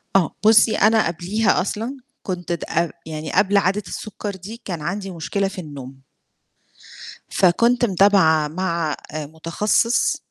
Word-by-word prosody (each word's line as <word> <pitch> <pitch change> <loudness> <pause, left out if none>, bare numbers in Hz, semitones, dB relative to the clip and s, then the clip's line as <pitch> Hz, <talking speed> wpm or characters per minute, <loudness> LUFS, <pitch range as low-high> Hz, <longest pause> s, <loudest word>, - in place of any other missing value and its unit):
آه، 180 -5 +2
بُصّي، 220 0 +6
أنا 220 -3 +4
قبليها 185 +5 0
أصلًا 225 +8 -4 0.3
كنت 180 -2 -4
د 170 - -2
ق 170 0 0
يعني 155 -1 -6
قبل 200 0 +3
عادة 200 +2 +1
السُكّر 205 -1 -6
دي 210 +6 -10
كان 175 -5 -4
عندي 195 +4 -4
مشكلة 195 +4 -2
في 195 -1 -6
النوم 135 -4 -10 1.3
فكنت 235 +7 +3
متابعة 185 -6 +4
مع 170 -2 -2 0.2
آآ 155 -1 -4
متخصص 170 +9 0
185 Hz, 135 wpm, -21 LUFS, 160-210 Hz, 1.3 s, بُصّي